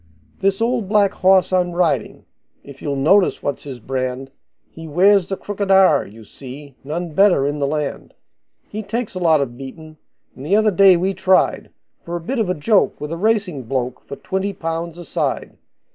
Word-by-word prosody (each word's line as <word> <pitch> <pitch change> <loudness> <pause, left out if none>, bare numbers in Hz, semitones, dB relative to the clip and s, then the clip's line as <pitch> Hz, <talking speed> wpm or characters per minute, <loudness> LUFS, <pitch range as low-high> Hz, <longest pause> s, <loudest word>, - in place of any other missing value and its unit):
This 195 +2 0
old 230 -4 0
black 205 -2 +3
horse 185 0 +3
I'm 180 -1 +1
riding 175 -1 -1 0.4
if 140 -1 -13
you'll 145 -2 -2
notice 180 +8 +3
what's 145 0 -3
his 135 -3 -7
brand, 130 +2 -4 0.4
He 165 0 -11
wears 185 +4 +4
the 195 - -3
crooked 205 0 -4
R, 190 -1 +5
you 110 +2 -14
see 135 +5 -11
none 165 +4 -4
better 190 -6 +4
in 145 +1 -2
the 140 - 0
land. 150 -1 -4 0.5
He 215 - -6
takes 225 +2 -4
a 185 - -5
lot 160 -4 +3
of 120 -3 -4
beatin', 155 +4 -10 0.4
and 130 - -10
the 175 +8 +1
other 215 0 +3
day 190 -1 +6
we 190 +3 0
tried, 190 0 +1 0.3
For 170 - -5
a - - -2
bit 240 +10 -3
of 215 -5 0
a 180 - 0
joke, 195 +7 +1
with 150 +1 -6
a - - -2
racing 190 - -1
bloke, 125 0 -3
for - - -6
twenty 190 +5 -3
pounds 165 -1 -4
a 175 - -9
side. - - -3
170 Hz, 190 wpm, -20 LUFS, 140-195 Hz, 0.5 s, day